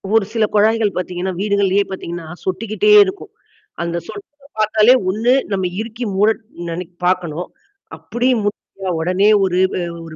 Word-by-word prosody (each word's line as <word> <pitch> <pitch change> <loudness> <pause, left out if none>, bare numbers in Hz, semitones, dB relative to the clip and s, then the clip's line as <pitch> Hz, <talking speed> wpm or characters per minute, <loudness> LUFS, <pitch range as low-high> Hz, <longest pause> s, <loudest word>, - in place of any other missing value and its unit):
ஒரு 220 - +5
சில 225 -2 +1
குழாய்கள் 215 0 +2
பாத்தீங்கன்னா, 180 +1 -3
வீடுகள்லயே 200 -1 +2
பாத்தீங்கன்னா 170 -3 -6 0.2
சொட்டிக்கிட்டே 215 - 0
இருக்கும். 380 +1 -7 0.5
அந்த 170 0 -2
சொட்டர 400 -7 -10 0.3
பார்த்தாலே 215 +3 +5 0.2
ஒண்ணு 225 +6 +2 0.2
நம்ம 190 -2 0 0.2
இருக்கி 230 +2 -6
மூட 210 +3 +4 0.4
நெனைக் 175 +1 -6
பாக்கணும். 180 -2 -1 0.5
அப்படி 240 +2 -2 0.2
முடியலயா, 195 -2 -4
உடனே 185 +5 +2
ஒரு 185 -1 +1 0.5
ஒரு 160 -1 -10
200 Hz, 130 wpm, -18 LUFS, 180-220 Hz, 0.5 s, ஒரு